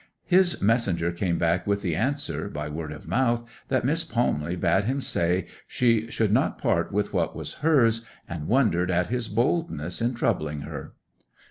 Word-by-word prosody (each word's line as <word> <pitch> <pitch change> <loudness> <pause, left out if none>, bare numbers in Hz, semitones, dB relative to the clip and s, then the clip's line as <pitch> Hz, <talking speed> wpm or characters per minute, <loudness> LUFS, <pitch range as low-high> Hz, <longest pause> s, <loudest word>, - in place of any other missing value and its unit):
His 180 -1 +4
messenger 100 -6 +2
came 85 0 -1
back 85 +2 +1
with 100 0 0
the 85 -5 0
answer, 140 - -1
by 75 0 -5
word 80 0 -5
of 75 - -10
mouth, 120 +4 +1 0.2
that 130 -2 0
Miss 160 +5 +3
Palmley 90 -9 -1
bade 90 +2 +2
him 135 +4 0
say 90 -7 0 0.2
she 115 -2 +1
should 110 -3 0
not - - +2
part - - 0
with - - -1
what - - 0
was - - -4
hers, 120 -8 +3 0.2
and 80 -3 -5
wondered 105 -8 +2
at 90 0 +1
his 120 -2 0
boldness 115 - -1
in 120 +2 0
troubling 75 -9 -1
her. - - -7
105 Hz, 170 wpm, -26 LUFS, 85-125 Hz, 0.2 s, His